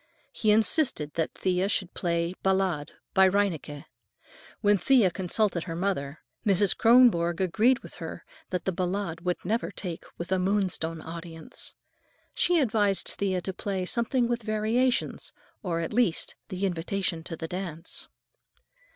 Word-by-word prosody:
He 215 - 0
insisted 215 - +3
that 160 -1 -2
Thea 185 +1 0
should 190 -3 0
play 170 -1 -1
a - - -8
"Ballade" 190 -6 +1 0.2
by 190 0 +6
Reinecke. 170 -7 -1 0.8
When 205 -1 +4
Thea 235 -7 +4
consulted 185 0 0
her 165 - -5
mother, 165 -6 -2 0.2
Mrs. 200 -2 +3
Kronborg 225 -9 +5
agreed 220 +8 +3
with - - -11
her - - -7 0.2
that 180 - -3
the 190 - +1
"Ballade" 180 -2 -2
would 180 0 -1
"never 225 +5 0
take" 175 -4 -6
with 170 +2 -6
a 190 - +2
Moonstone 180 -4 0
audience. 165 0 -7 0.6
She 350 0 +3
advised 210 -7 +2
Thea 190 -2 -1
to 190 +2 -4
play 190 -1 -3
"something 235 +4 +1
with 240 0 -1
variations," 220 +4 0 0.3
or, 170 -3 -2
at 165 - -4
least, 230 -8 +1
"The 185 +1 -2
Invitation 175 -1 -2
to 165 - -5
the 160 - -5
Dance." 170 -2 -4
190 Hz, 145 wpm, -27 LUFS, 170-210 Hz, 0.8 s, by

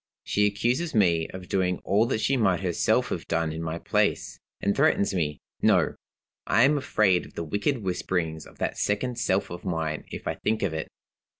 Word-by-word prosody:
She 105 0 +2
accuses 120 +10 0
me 85 -6 +3
of 95 -1 -9
doing 90 -2 +1
all 105 +4 +2
that 110 -3 -1
she 135 - +2
might 95 -8 +2
herself 90 -3 +1
have - - -4
done 80 -1 0
in 80 - -5
my 80 0 -3
place, - - 0 0.2
and 100 0 0
threatens 100 - +3
me 75 -5 -1 0.2
No! - - +3 0.5
I 115 - +4
am 145 +3 +5
afraid 105 -10 +2
of - - -19
the 85 - -3
wicked 105 - -1
whisperings 90 -4 -2
of - - -17
that - - -2
second 120 +4 -1
self 95 -4 0
of 85 - -7
mine 80 -3 -2
if - - -7
I - - 0
think 110 0 -1
of 95 -5 0
it. 80 0 -3
95 Hz, 195 wpm, -26 LUFS, 85-110 Hz, 0.5 s, am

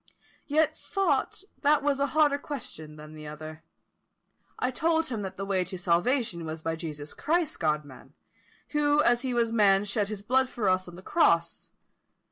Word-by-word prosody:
Yet 310 +1 +2
thought 390 -1 -1 0.2
that 290 0 +3
was 285 -1 +1
a 280 - +2
harder 290 -2 +4
question 160 - -7
than 150 0 -11
the 155 -1 -9
other. 155 +1 -8 1.0
I 255 - 0
told 320 +4 +1
him 225 -4 -3
that 190 -1 -5
the 195 - -4
way 190 -2 +1
to 185 +1 -7
salvation 175 +2 +1
was 160 0 -6
by 165 0 -1
Jesus 150 -3 -7
Christ, 330 0 0
God 150 -2 0
man, 130 -3 -15 0.5
who 295 0 +3
as 240 0 +3
he 255 -2 -2
was 230 -1 +2
man 205 -3 +4
shed 205 0 0
his 205 -1 -6
blood 260 +4 +2
for 220 -6 -2
us 185 0 +1
on 175 - -10
the 185 - -12
cross, 170 - +2
&c. - - -32
205 Hz, 185 wpm, -28 LUFS, -, 1.0 s, harder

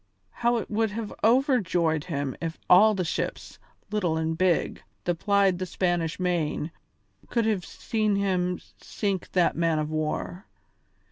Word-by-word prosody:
How 240 0 +1
it 225 - -5
would 220 +1 +1
have 215 0 -5
overjoyed 200 - +2
him 140 -6 -3
if 165 -1 -3
all 210 +4 +7
the 185 -2 -1
ships, - - -4 0.3
little 180 -7 0
and 160 0 -1
big, 180 -1 +1 0.2
that 175 -2 -1
plied 200 -3 +3
the 185 - -3
Spanish 175 -2 -1
Main 170 -3 -1 0.6
could 235 -2 +1
have 210 -5 0
seen 215 +1 -1
him 180 -2 0 0.2
sink 200 -4 -3
that 180 -2 +3
man 165 -1 +1
of 155 0 -2
war. 155 +5 -3
180 Hz, 145 wpm, -26 LUFS, 165-210 Hz, 0.6 s, all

